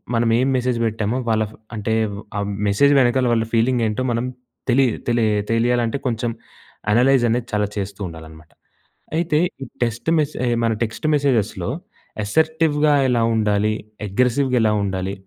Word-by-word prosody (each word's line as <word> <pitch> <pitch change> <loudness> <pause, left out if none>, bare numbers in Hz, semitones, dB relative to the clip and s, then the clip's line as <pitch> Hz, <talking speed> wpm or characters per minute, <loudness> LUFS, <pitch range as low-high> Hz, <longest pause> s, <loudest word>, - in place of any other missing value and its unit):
మనం 115 0 +2
ఏం 130 - +2
మెసేజ్ 125 -1 0
పెట్టామో, 110 +2 -2
వాళ్ళ 110 -1 +2
ఫ్ - - -15 0.2
అంటే 110 +1 -2 0.4
ఆ - - 0 0.3
మెసేజ్ 140 +8 +4
వెనకాల, 125 +1 +2
వాళ్ళ 115 -1 +1
ఫీలింగ్ 120 +2 +2
ఏంటో 105 +3 -2
మనం 115 +1 -1 0.4
తెలీదు. 125 -1 +3
తెలియ 120 -2 +2 0.2
తెలియాలంటే, 120 +1 +1
కొంచెం 120 0 -1 0.6
అనలైజ్ 125 +3 +4
అనేది 120 +1 -1
చాలా 105 -1 +1
చేస్తూ 100 0 -4
ఉండాలనమాట. 80 -1 -12 0.6
అయితే 165 -2 +1 0.3
ఈ - - -6 0.2
టెక్స్ట్ 115 +5 -2
మెసే 145 -4 -1 0.2
మన 115 - +2
టెక్స్ట్ 115 +7 -3
మెసేజెస్‌లో 115 -10 0 0.5
అసర్టివ్‌గా 155 +4 +2 0.2
ఎలా 120 -2 +2
ఉండాలి? 105 0 +1 0.3
అగ్రెసివ్‌గా 125 +5 +1
ఎలా 110 -1 +3
ఉండాలి? 95 -1 -2
115 Hz, 140 wpm, -21 LUFS, 105-130 Hz, 0.6 s, మెసేజ్